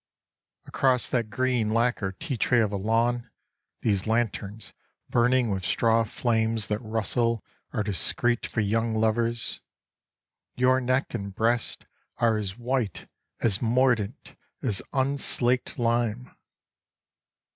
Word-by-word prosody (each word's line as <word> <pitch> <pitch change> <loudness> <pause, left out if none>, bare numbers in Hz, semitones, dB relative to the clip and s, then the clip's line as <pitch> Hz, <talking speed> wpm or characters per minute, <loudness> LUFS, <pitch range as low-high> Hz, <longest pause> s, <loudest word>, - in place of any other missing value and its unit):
Across 130 -2 +1
that 115 -4 0
green 125 0 0
lacquer 115 -4 +1
tea 140 - -4
tray 120 +1 +2
of 110 -3 +2
a - - -2
lawn, 115 +4 0 0.5
these 100 -2 +1
lanterns 110 -2 -2 0.4
burning 120 -1 +3
with 95 -1 -2
straw 115 +5 +3
flames 110 -1 0
that 105 0 0
rustle 115 +1 0 0.3
are 105 - -1
discreet 120 +4 0
for 110 - -1
young 110 +2 0
lovers. 115 +1 +1 0.9
Your 130 +1 +3
neck 130 +1 0
and 100 -4 -5
breast 115 +2 0 0.3
are 115 -2 +3
as 100 -1 -4
white, 120 -5 -2 0.3
as 105 -4 +2
mordant, 120 -1 +1 0.3
as 110 -7 0
unslaked 130 -2 0
lime." 120 0 0
115 Hz, 115 wpm, -26 LUFS, 110-125 Hz, 0.9 s, burning